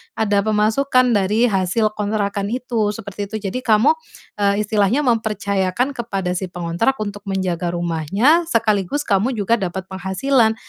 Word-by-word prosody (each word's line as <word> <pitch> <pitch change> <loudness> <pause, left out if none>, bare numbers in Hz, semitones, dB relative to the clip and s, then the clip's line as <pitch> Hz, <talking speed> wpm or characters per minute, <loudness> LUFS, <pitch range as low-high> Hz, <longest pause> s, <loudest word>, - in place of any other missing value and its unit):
Ada 205 -2 +1
pemasukan 245 +4 +2
dari 210 +2 +2
hasil 195 +3 +1
kontrakan 205 -1 -2
itu, 230 -3 -1
seperti 200 -1 -6
itu. 220 - -7
Jadi 200 +5 -2
kamu, 225 - +4 0.5
eee, 200 +1 +2
istilahnya 210 +6 +1
mempercayakan 220 -1 0
kepada 200 -8 -3
si 190 - -3
pengontrak 175 +8 -1
untuk 205 -1 -7
menjaga 180 -3 -2
rumahnya 190 - +2
sekaligus 220 - 0
kamu 220 +5 +1
juga 220 +2 +1
dapat 190 -1 -3
penghasilan. 220 +5 +1
210 Hz, 135 wpm, -20 LUFS, 190-230 Hz, 0.5 s, kamu